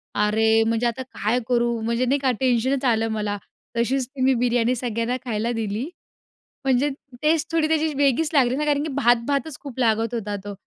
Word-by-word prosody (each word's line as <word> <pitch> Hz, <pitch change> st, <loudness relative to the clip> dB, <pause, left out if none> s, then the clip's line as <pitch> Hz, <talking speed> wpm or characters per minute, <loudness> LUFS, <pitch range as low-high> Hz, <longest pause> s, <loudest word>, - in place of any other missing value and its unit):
अरे! 220 Hz, +2 st, +3 dB
म्हणजे 230 Hz, +1 st, +1 dB
आता 235 Hz, +3 st, -3 dB
काय 240 Hz, -1 st, -1 dB
करू? 235 Hz, -1 st, +1 dB
म्हणजे 235 Hz, +3 st, 0 dB
नाही 275 Hz, +3 st, +1 dB
का? 265 Hz, -2 st, +2 dB
टेन्शनच 260 Hz, +1 st, +1 dB
आलं 225 Hz, -2 st, +2 dB
मला. 210 Hz, -1 st, -2 dB, 0.4 s
तशीच 250 Hz, +2 st, +1 dB
ती 265 Hz, -1 st, -9 dB
मी 265 Hz, +1 st, +4 dB
बिर्याणी 245 Hz, 0 st, +1 dB
सगळ्यांना 235 Hz, +1 st, -2 dB
खायला 230 Hz, 0 st, -1 dB
दिली. 220 Hz, -1 st, -2 dB, 0.8 s
म्हणजे 270 Hz, +2 st, +2 dB, 0.3 s
टेस्ट 315 Hz, +1 st, +1 dB
थोडी 315 Hz, -1 st, +2 dB
त्याची 315 Hz, -1 st, +1 dB
वेगळीच 285 Hz, +2 st, +2 dB
लागली 255 Hz, -2 st, +3 dB
ना, 300 Hz, -, -1 dB
कारण 290 Hz, -1 st, +1 dB
की 305 Hz, -2 st, -4 dB
भात-भातच 265 Hz, +3 st, +1 dB
खूप 270 Hz, -3 st, -9 dB
लागत 225 Hz, -1 st, +1 dB
होता 210 Hz, -3 st, -3 dB
तो. 205 Hz, -1 st, -6 dB
245 Hz, 180 wpm, -23 LUFS, 225-275 Hz, 0.8 s, मी